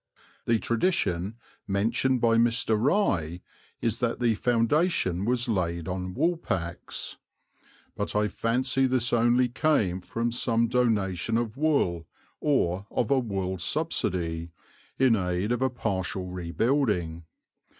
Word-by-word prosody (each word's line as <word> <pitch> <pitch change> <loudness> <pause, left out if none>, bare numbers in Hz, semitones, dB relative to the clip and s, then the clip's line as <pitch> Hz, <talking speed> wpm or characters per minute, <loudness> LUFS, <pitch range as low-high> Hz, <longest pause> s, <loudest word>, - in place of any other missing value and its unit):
The 115 - +4
tradition, 110 - 0 0.3
mentioned 115 +6 +1
by 115 -1 +4
Mr. 115 -1 +2
Rye, 105 - +1 0.4
is 115 -1 0
that 120 -1 -1
the 120 -2 +3
foundation 115 - +1
was 120 +1 +1
laid 85 -6 -1
on 90 0 -4
woolpacks; 95 - -2 0.8
"but - - -3
I 105 0 +2
fancy 130 +5 0
this 125 -2 0
only 120 +2 +4
came 115 - +1
from 115 +5 -2
some 115 -1 +1
donation 110 -4 +1
of 115 -2 -2
wool, 135 - +1 0.3
or 100 - +1
of 120 - -1
a 135 - +5
wool 95 -5 -3
subsidy, 85 - -1 0.5
in 130 -3 +4
aid 90 +1 -1
of 120 0 0
a 130 - +3
partial 95 -6 -2
rebuilding. 90 - -1
115 Hz, 120 wpm, -27 LUFS, 90-125 Hz, 0.8 s, a